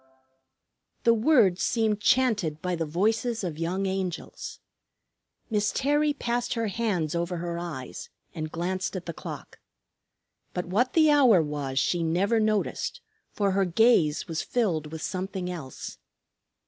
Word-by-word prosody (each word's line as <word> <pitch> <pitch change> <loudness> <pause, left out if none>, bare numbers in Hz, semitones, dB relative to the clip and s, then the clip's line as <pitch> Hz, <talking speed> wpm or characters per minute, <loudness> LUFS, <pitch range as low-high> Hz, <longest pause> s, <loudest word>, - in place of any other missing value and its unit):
The 230 - +6
words 225 - +4
seemed 220 -3 +1
chanted 210 -12 +2
by 180 +2 -1
the 165 -2 -2
voices 220 +7 0
of 165 -4 -4
young 180 +4 -1
angels. 190 -2 -4 0.9
Miss 210 -1 +1
Terry 295 +2 +2
passed 245 -3 -2
her 230 -2 -1
hands 190 -8 -1
over 170 +1 -1
her 170 0 -3
eyes 155 -8 -6 0.2
and 155 -3 -5
glanced 185 +3 -2
at 180 - -5
the 170 - -4
clock. - - -8 1.0
But 180 - -2
what 225 +9 +1
the 310 -2 +5
hour 260 -10 +6
was 145 -4 -3
she 175 +5 +2
never 185 +7 +2
noticed, 215 -1 0 0.3
for 200 -2 0
her 195 +1 +2
gaze 180 -5 +3
was 165 -1 -2
filled 165 -11 -1
with 160 0 -6
something 185 -1 -3
else. 155 -7 -7
185 Hz, 140 wpm, -27 LUFS, 170-225 Hz, 1.0 s, The